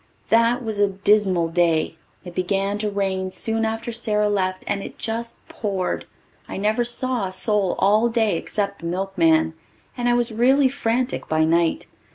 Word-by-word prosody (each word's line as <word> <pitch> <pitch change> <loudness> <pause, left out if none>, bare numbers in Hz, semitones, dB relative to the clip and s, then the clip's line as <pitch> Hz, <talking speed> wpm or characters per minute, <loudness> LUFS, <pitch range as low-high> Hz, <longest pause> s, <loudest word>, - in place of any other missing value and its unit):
That 230 +2 +3
was 215 -2 -3
a 205 -1 +4
dismal 195 -3 +2
day. 165 -2 +1 0.3
It 175 - -8
began 195 +3 -1
to 210 0 -1
rain 190 -2 -1
soon 225 +4 -1
after 225 +1 -3
Sara 210 -2 0
left 185 -2 -1
and 200 -1 -2
it - - -9
just 230 +1 -4
poured. 195 -4 -3 0.4
I - - -6
never 215 +4 +1
saw 240 -2 0
a - - -7
soul 195 0 +1
all 215 +4 +3
day 225 -5 +1
except 200 +3 -3
the 170 - -6
milkman, 170 -3 +1 0.4
and 245 0 0
I 240 - +3
was 240 -1 +1
really 260 +4 +4
frantic 250 -1 -2
by 155 0 +2
night. 165 +1 +1
205 Hz, 170 wpm, -22 LUFS, 185-230 Hz, 0.4 s, a